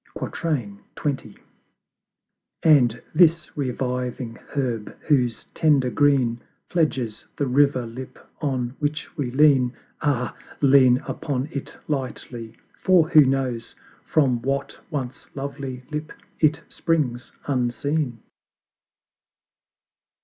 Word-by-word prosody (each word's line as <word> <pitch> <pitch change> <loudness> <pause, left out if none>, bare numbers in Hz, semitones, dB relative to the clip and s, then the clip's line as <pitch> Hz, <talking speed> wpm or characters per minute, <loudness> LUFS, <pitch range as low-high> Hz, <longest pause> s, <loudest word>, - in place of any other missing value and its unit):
XX. 135 - -3 1.3
And 125 -7 +5
this 165 0 +4
reviving 125 -3 -2 0.2
Herb 120 -6 -3
whose 125 -6 +1
tender 140 -5 +3
Green 130 -5 +3 0.3
Fledges 130 -10 0
the 145 - +1
River 135 -1 +3
Lip 125 +3 -8 0.2
on 130 -4 -1
which 150 +1 -3
we 140 -5 -2
lean 130 -2 +4 0.3
Ah, 130 -5 0 0.2
lean 130 -3 +6
upon 140 -1 -2
it 140 - -6
lightly! 125 -5 -4 0.2
for 175 -4 +5
who 155 - +8
knows 130 -4 -1 0.3
From 130 -6 +2
what 135 +3 -2
once 135 -5 -5
lovely 135 -2 -5
Lip 150 +1 -4 0.3
it 155 0 +3
springs 140 -8 -1
unseen! 130 0 -1
135 Hz, 95 wpm, -24 LUFS, 125-150 Hz, 1.3 s, who